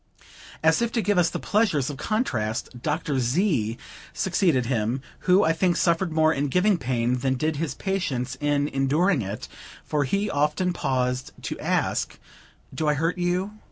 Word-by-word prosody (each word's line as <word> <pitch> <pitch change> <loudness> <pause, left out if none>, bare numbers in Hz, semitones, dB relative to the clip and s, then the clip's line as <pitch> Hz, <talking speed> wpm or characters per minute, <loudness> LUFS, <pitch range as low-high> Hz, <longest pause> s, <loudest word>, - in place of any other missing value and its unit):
As 160 +6 +4
if 235 -1 0
to 230 - +1
give 205 -3 +2
us 170 - +3
the - - -4
pleasures 185 - +1
of 140 - -8
contrast, 125 - -2
Dr. 150 -2 -1
Z. 125 - +1 0.4
succeeded 170 -8 +1
him, 120 +2 -1 0.3
who, 185 +3 +6
I 160 - +3
think, 175 +1 +1
suffered 170 0 +1
more 160 0 +3
in 145 +2 -1
giving 180 +6 +2
pain 125 -1 0
than 130 +1 0
did 155 +3 -1
his 150 -3 -2
patients 135 -10 -2
in 145 -1 +1
enduring 140 +4 +2
it; 100 +1 -5 0.4
for 150 -2 0
he 200 +10 0
often 150 +3 0
paused 130 -5 -1
to - - -4
ask: - - -1 0.6
"Do 155 - -2
I 150 - +3
hurt 165 +4 -1
you?" 185 +4 -1
150 Hz, 165 wpm, -25 LUFS, 130-180 Hz, 0.6 s, who